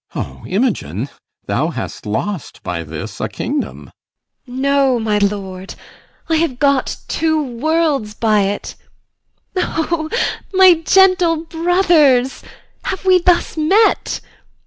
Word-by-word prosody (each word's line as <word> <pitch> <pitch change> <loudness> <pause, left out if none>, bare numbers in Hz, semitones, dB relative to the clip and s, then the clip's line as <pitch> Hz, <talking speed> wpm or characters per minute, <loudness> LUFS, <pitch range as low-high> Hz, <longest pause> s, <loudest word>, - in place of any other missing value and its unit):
O - - -6
Imogen, 145 - -1 0.4
Thou - - 0
hast - - -6
lost 155 - -4
by 90 -1 -3
this 75 0 -7
a - - -2
kingdom. 70 +2 -4 0.6
IMOGEN. 250 +1 -6
No, 275 -3 +3
my 215 -2 0
lord; 195 -2 -3 0.5
I 320 - +2
have 315 -6 0
got 280 -1 +1
two 315 -1 0
worlds 275 -3 -1
by't. 205 -3 0 0.8
O 325 -3 -1 0.4
my 375 -1 +7
gentle 360 -3 +4
brothers, 325 -7 +2 0.4
Have 380 - -4
we 370 -1 +5
thus 350 0 +2
met? 385 +9 +2
275 Hz, 110 wpm, -17 LUFS, 205-330 Hz, 0.8 s, my